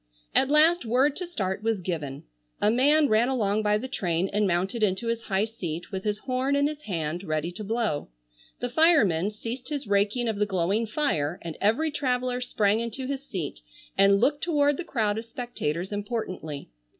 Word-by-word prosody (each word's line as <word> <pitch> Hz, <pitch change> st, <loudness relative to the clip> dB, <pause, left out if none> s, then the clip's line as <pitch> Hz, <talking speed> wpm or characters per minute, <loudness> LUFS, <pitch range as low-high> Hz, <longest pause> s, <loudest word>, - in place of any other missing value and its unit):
At 265 Hz, -, +3 dB
last 315 Hz, +4 st, +5 dB
word 260 Hz, +5 st, +2 dB
to 360 Hz, -, -3 dB
start 195 Hz, -, -2 dB
was 225 Hz, -2 st, 0 dB
given. 155 Hz, -7 st, -4 dB, 0.4 s
A 210 Hz, -, +3 dB
man 290 Hz, +5 st, +4 dB
ran 230 Hz, +1 st, +3 dB
along 215 Hz, -5 st, +1 dB
by 210 Hz, 0 st, +2 dB
the 250 Hz, +5 st, -5 dB
train 180 Hz, -7 st, -1 dB
and 210 Hz, 0 st, +2 dB
mounted 190 Hz, +6 st, 0 dB
into 205 Hz, +2 st, +1 dB
his 230 Hz, 0 st, -1 dB
high 195 Hz, -1 st, 0 dB
seat 175 Hz, -7 st, -6 dB
with 190 Hz, 0 st, -4 dB
his 210 Hz, -1 st, 0 dB
horn 255 Hz, +4 st, 0 dB
in 285 Hz, 0 st, +3 dB
his 300 Hz, 0 st, -2 dB
hand 170 Hz, -, -3 dB
ready 155 Hz, -1 st, -2 dB
to 190 Hz, +4 st, -7 dB
blow. 220 Hz, -7 st, -1 dB, 0.5 s
The 245 Hz, -, -1 dB
fireman 235 Hz, -, +4 dB
ceased 230 Hz, +5 st, -6 dB
his 290 Hz, -3 st, -3 dB
raking 205 Hz, +4 st, +1 dB
of 220 Hz, -2 st, -1 dB
the 210 Hz, 0 st, +1 dB
glowing 195 Hz, +4 st, 0 dB
fire 180 Hz, -, 0 dB
and 165 Hz, -2 st, -5 dB
every 245 Hz, +10 st, +2 dB
traveller 250 Hz, -3 st, -1 dB
sprang 215 Hz, -3 st, +1 dB
into 235 Hz, +3 st, -4 dB
his 275 Hz, 0 st, -3 dB
seat 175 Hz, -8 st, -4 dB, 0.4 s
and 195 Hz, 0 st, +5 dB
looked 285 Hz, +6 st, +2 dB
toward 290 Hz, -4 st, +2 dB
the -, -, -3 dB
crowd 220 Hz, -9 st, 0 dB
of 225 Hz, -, -8 dB
spectators 220 Hz, -8 st, -4 dB
importantly. 205 Hz, -, -4 dB
220 Hz, 185 wpm, -27 LUFS, 190-255 Hz, 0.5 s, last